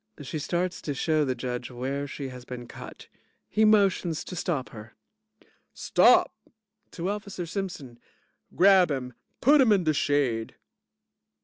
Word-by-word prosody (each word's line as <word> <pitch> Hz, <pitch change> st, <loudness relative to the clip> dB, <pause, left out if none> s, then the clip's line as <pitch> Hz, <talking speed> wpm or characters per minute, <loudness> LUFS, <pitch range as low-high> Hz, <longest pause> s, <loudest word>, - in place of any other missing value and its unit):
(She 145 Hz, +3 st, -5 dB
starts 175 Hz, +4 st, -2 dB
to 145 Hz, -, -4 dB
show 155 Hz, +2 st, +1 dB
the 130 Hz, -3 st, -1 dB
JUDGE 125 Hz, -1 st, -5 dB
where 135 Hz, +3 st, -4 dB
she 140 Hz, -1 st, -6 dB
has 125 Hz, -1 st, -10 dB
been 125 Hz, -1 st, -8 dB
cut. -, -, -11 dB, 0.4 s
He 215 Hz, 0 st, +2 dB
motions 195 Hz, -6 st, +2 dB
to 180 Hz, -, -8 dB
stop 155 Hz, -7 st, -2 dB
her.) 110 Hz, 0 st, -12 dB, 0.5 s
JUDGE -, -, -28 dB, 0.3 s
Stop! -, -, +4 dB, 0.6 s
(to 180 Hz, +3 st, -2 dB
Officer 200 Hz, -3 st, -5 dB
Simpson) 170 Hz, -, -6 dB, 0.6 s
Grab 190 Hz, -1 st, +6 dB
him. 130 Hz, -3 st, -4 dB, 0.3 s
Put 290 Hz, +3 st, +6 dB
him 245 Hz, -4 st, +4 dB
in 195 Hz, -3 st, +3 dB
de 155 Hz, -1 st, +2 dB
shade. 135 Hz, -6 st, 0 dB
155 Hz, 145 wpm, -26 LUFS, 130-185 Hz, 0.6 s, Grab